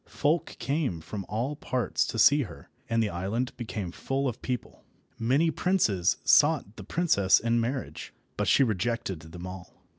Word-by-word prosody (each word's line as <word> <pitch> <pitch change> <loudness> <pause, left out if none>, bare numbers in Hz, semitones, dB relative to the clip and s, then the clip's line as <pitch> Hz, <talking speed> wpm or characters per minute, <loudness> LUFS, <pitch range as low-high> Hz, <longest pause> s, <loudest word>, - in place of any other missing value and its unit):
Folk 155 +4 0
came 135 - -1
from 95 +4 -7
all 120 +7 -2
parts 130 -4 -1
to - - -4
see 145 +7 +6
her, 95 - -9 0.2
and 115 0 +2
the 105 - 0
island 100 +9 -2
became 105 -6 -5
full 135 +8 -2
of 125 -2 -4
people. 125 -2 -5 0.4
Many 140 +8 +2
princes 140 - +1
sought 145 -9 +4
the 100 - -9
princess 100 - +3
in 115 0 +1
marriage, 130 +3 -4 0.2
but - - -1
she - - +5
rejected 110 -4 -1
them 80 +3 -10
all. 90 -1 -10
115 Hz, 160 wpm, -28 LUFS, 95-140 Hz, 0.4 s, see